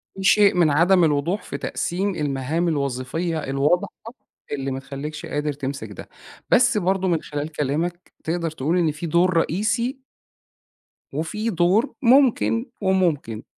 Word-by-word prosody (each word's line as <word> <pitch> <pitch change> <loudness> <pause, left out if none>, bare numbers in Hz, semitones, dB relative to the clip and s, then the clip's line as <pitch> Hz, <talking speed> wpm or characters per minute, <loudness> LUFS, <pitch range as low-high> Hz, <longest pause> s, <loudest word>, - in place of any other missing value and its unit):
في 195 - -6
شيء 205 +1 +5
من 170 -3 +4
عدم 175 +5 +4
الوضوح 160 +6 +1
في - - -6
تقسيم 190 +3 -2
المهام 150 +3 -1
الوظيفية 145 +3 -2
الواضحة، 140 +6 +1 0.6
اللي 135 -1 -3
ما 130 - -3
تخلّيكش 145 +3 -7
قادر 150 0 -2
تمسك 140 0 -5
ده، - - -10 0.4
بس 250 -3 +4
برضه 190 0 +1
من 170 -3 +1
خلال 145 +1 -5
كلامك، 160 +5 -3
تقدر 165 0 -2
تقول 155 +3 -1
إن 165 -4 +2
في 150 +3 -7
دور 170 +2 +2
رئيسي 230 - 0 1.1
وفي 210 +10 -2
دور 185 - +2
ممكن 230 - +4 0.2
وممكن، 170 - 0
165 Hz, 135 wpm, -23 LUFS, 145-190 Hz, 1.1 s, شيء